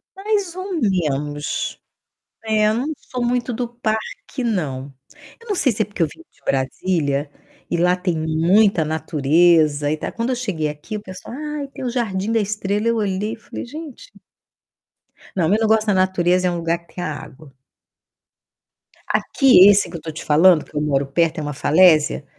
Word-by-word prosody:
Mais 395 -3 -1
ou 375 +1 -6
menos. 150 - -1 0.7
É, 215 -1 +2
não 250 +6 -2
sou 250 -1 -5
muito 245 0 0
do 240 +1 -2
parque 235 +2 -4
não. 145 - -2 0.5
Eu 465 - -17
não 405 - 0
sei 270 -8 +2
se 215 0 0
é - - -6
porque 205 -4 -7
eu 160 - +3
vim 330 - -14
de - - -30
Brasília, 140 +1 -1 0.4
e - - 0
lá 180 +1 +3
tem 180 -3 -2
muita 165 +4 +3
natureza 155 -1 +2
e 155 - -1
tal, - - -5
quando 235 +2 -2
eu - - 0
cheguei 190 -11 -2
aqui 150 +9 -6
o 205 - -8
pessoal: 185 +5 -9
"Ai, 300 -2 -4
tem 265 - -8
o - - 0
jardim 220 -4 -2
da 230 - +2
estrela", 210 +1 -1
eu 230 - +2
olhei 205 +1 -1
e - - -5
falei: 225 - -8
"Gente". 300 +1 -10 1.2
Não, 170 -3 +1
meu 210 +2 +3
negócio 220 0 +2
da 205 - +3
natureza 185 -1 +2
é 180 - +1
um - - -3
lugar 170 0 -1
que 170 - -25
tenha 180 -2 -3
água. 145 0 -11 1.6
Aqui 250 -9 +5
esse 205 0 +4
que 170 - -6
eu 160 - -12
tô 160 - -6
te 155 - -8
falando, 160 +2 +5
que - - -21
eu 150 - 0
moro 140 -2 +1
perto, 165 +3 +1
é - - -3
uma 145 0 -4
falésia, 155 0 +4
185 Hz, 185 wpm, -20 LUFS, 155-225 Hz, 1.6 s, Aqui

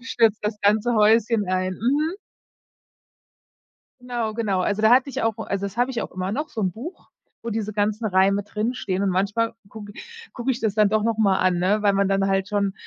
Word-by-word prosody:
„stürzt 225 -5 +1
das 210 0 -3
ganze 215 +4 +2
Häuschen 220 -1 +3
ein”, 185 0 -1
mhm. 290 - 0 1.9
Genau, 240 -3 -3
genau. 210 -4 -1
Also, 205 +3 -1
da 220 +1 +4
hatte 255 +3 +4
ich - - -4
auch 225 -1 0
also, 200 -2 -3
das 200 - -9
habe 245 +2 +1
ich 240 -3 -3
auch - - -5
immer 185 +1 -4
noch 300 +7 -3
so 220 - -5
'n 185 -2 0
Buch, 305 - -10 0.3
wo 235 - -4
diese 215 -1 -3
ganzen 210 +2 0
Reime 195 +1 +2
drinstehen 210 -2 -3
und 200 - +1
manchmal 200 +5 0 0.2
gucke 205 -1 -10 0.4
gucke 250 +1 -2
ich 245 - -1
das 215 -3 -1
dann 210 -1 +4
doch 215 +1 +1
noch 225 0 -1
mal 195 -3 +3
an, 185 -1 +2
ne? 200 +4 +1
Weil 205 -1 +4
man 195 0 +1
dann 195 0 +1
halt 195 0 0
schon, 200 -2 0
210 Hz, 210 wpm, -23 LUFS, 195-230 Hz, 1.9 s, da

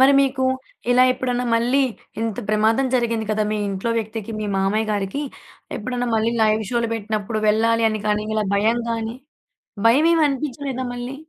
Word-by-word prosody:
మరి 270 +1 +7
మీకు 265 -1 +1 0.5
ఇలా 250 +1 +6
ఎప్పుడన్నా 250 -1 -2
మళ్ళీ 245 +4 +2 0.4
ఇంత 225 -3 -2
ప్రమాదం 220 +5 +2
జరిగింది 230 -3 0
కదా! 215 0 +1
మీ 215 - -1
ఇంట్లో 195 +4 -2
వ్యక్తికి 220 0 -5
మీ 210 - -2
మామయ్య 210 +3 +1
గారికి. 205 +8 -2 0.5
ఎప్పుడన్నా 245 +2 -3
మళ్ళీ 225 +1 +1
లైవ్ 215 0 +3
షోలు 235 -1 0
బెట్టినప్పుడు 215 0 -3
వెళ్ళాలి 230 +1 +3
అని 215 0 -3
కానీ, 210 0 +1
ఇలా 215 -1 +1
భయం 220 +4 +2
గానీ, 225 0 -3 0.7
భయమేమనిపించలేదా 285 -2 +2
మళ్ళీ? 245 +2 -5
230 Hz, 150 wpm, -22 LUFS, 215-255 Hz, 0.7 s, మరి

